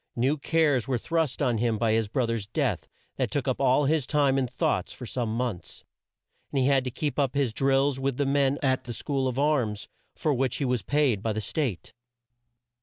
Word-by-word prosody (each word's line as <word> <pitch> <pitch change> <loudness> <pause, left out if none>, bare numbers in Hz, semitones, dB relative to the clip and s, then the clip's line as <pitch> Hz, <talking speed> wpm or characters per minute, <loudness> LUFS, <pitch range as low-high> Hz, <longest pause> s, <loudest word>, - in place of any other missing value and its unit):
New 130 +5 +2
cares 150 -4 +1
were 130 -2 +1
thrust 160 +2 -1
on 120 -5 +1
him 115 -1 +1
by 115 0 +1
his 110 -1 +1
bro 120 +4 0
ther's 115 -3 -3
death, 120 - -1 0.3
that - - 0
took - - -2
up - - -1
all 130 +3 +3
his 150 -2 +1
time 145 -3 +2
and 130 -2 -1
thoughts 125 - -1
for 125 - -9
some 120 -1 -2
months; 110 -7 -4 0.7
and - - -2
he 130 - +2
had 135 -1 +3
to 130 - -2
keep 145 +4 -3
up 140 -1 +1
his 135 -5 +1
drills 135 +1 +2
with 135 -1 -1
the 145 - +1
men 140 0 +2
at 130 -1 +1
the 120 - -5
school 135 +1 -2
of 125 -1 -3
arms, 135 -8 0 0.3
for 155 - 0
which 130 -1 0
he 140 - -1
was 125 -3 0
paid 140 -8 +1
by 110 - -1
the 110 - -2
State. 110 - -3
130 Hz, 215 wpm, -27 LUFS, 115-140 Hz, 0.7 s, all